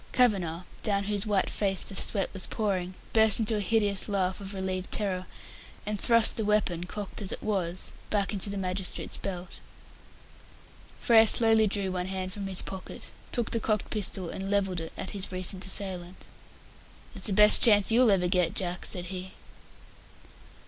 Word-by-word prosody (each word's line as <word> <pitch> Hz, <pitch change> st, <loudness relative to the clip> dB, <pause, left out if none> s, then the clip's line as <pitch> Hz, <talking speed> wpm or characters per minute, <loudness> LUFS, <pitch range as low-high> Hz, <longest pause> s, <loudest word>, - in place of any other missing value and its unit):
Kavanagh, 185 Hz, -9 st, +1 dB, 0.2 s
down 200 Hz, -2 st, -1 dB
whose 205 Hz, +1 st, 0 dB
white 200 Hz, -2 st, 0 dB
face 195 Hz, -2 st, +2 dB
the 195 Hz, -, -6 dB
sweat 195 Hz, +1 st, +3 dB
was 195 Hz, -2 st, 0 dB
pouring, 190 Hz, -4 st, -3 dB, 0.2 s
burst 220 Hz, -2 st, +5 dB
into 220 Hz, 0 st, 0 dB
a -, -, -2 dB
hideous 205 Hz, 0 st, +2 dB
laugh 190 Hz, -1 st, -2 dB
of 200 Hz, 0 st, -8 dB
relieved 185 Hz, -1 st, -4 dB
terror, 185 Hz, -3 st, -2 dB, 0.6 s
and 210 Hz, -1 st, -4 dB
thrust 230 Hz, -1 st, +4 dB
the 220 Hz, -, -2 dB
weapon, 205 Hz, -5 st, -1 dB
cocked 205 Hz, +3 st, -7 dB
as 195 Hz, -, -3 dB
it -, -, -7 dB
was, 185 Hz, -4 st, -2 dB, 0.2 s
back 200 Hz, -2 st, -1 dB
again 205 Hz, -, -2 dB
into 195 Hz, -, -2 dB
the 200 Hz, -, -5 dB
magistrate's 185 Hz, 0 st, -2 dB
belt. 180 Hz, -2 st, -7 dB, 1.4 s
Frere 225 Hz, -2 st, +5 dB
slowly 225 Hz, -1 st, +5 dB
drew 195 Hz, -1 st, -2 dB
one 180 Hz, 0 st, -4 dB
hand 185 Hz, -1 st, -5 dB
from 200 Hz, -1 st, -6 dB
his 190 Hz, -1 st, -1 dB
pocket, 190 Hz, -1 st, -7 dB, 0.2 s
took 240 Hz, -2 st, -2 dB
the 230 Hz, -, 0 dB
cocked 215 Hz, -2 st, -2 dB
pistol 190 Hz, -4 st, -2 dB
and 195 Hz, 0 st, -6 dB
levelled 195 Hz, -3 st, -1 dB
it 165 Hz, 0 st, -7 dB
at -, -, -4 dB
his 195 Hz, -2 st, -4 dB
recent 185 Hz, +1 st, +1 dB
assailant. 185 Hz, -2 st, -4 dB, 0.9 s
"That's -, -, -1 dB
the 205 Hz, -, -1 dB
best 210 Hz, +2 st, +8 dB
chance 210 Hz, -3 st, +6 dB
you'll 240 Hz, +1 st, +4 dB
ever 185 Hz, -3 st, +2 dB
get, 180 Hz, -2 st, 0 dB
Jack," 180 Hz, -1 st, -1 dB
said 180 Hz, -2 st, -2 dB
he. 185 Hz, 0 st, -8 dB
195 Hz, 175 wpm, -27 LUFS, 185-210 Hz, 1.4 s, best